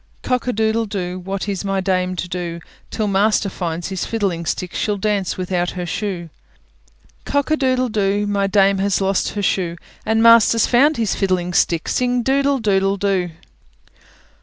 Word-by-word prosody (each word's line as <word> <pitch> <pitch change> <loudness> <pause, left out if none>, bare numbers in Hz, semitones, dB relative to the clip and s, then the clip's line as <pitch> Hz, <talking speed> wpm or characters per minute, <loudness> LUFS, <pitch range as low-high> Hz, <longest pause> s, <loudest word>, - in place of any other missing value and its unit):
Cock 250 -1 -1
a - - +2
doodle 220 0 0
doo! 185 -3 -4
What 195 +2 -4
is 200 -1 -3
my 195 -1 -1
dame 185 -1 0
to 180 - -4
do? 175 -1 -4 0.3
Till 215 - -2
master 205 +1 +2
finds 170 -2 -4
his 190 -2 -3
fiddling 190 -7 -2
stick, 180 +2 -3
She'll 210 -1 -1
dance 200 -2 -1
without 180 -1 -1
her 180 - -3
shoe. 175 -2 -4 0.9
Cock 285 +1 -1
a - - +5
doodle 255 -3 +1
doo! 205 -1 0
My 200 -1 0
dame 195 0 +3
has 200 -1 +1
lost 195 0 0
her 205 - -3
shoe, 180 -3 0 0.3
And 225 +1 +1
master's 230 -1 +6
found 285 +5 +3
his 225 -4 0
fiddling 185 -2 -1
stick; 170 -2 +1
Sing 250 -1 0
doodle 275 +2 +2
doodle 195 -3 +1
doo! 190 -3 0
195 Hz, 170 wpm, -19 LUFS, 185-220 Hz, 0.9 s, master's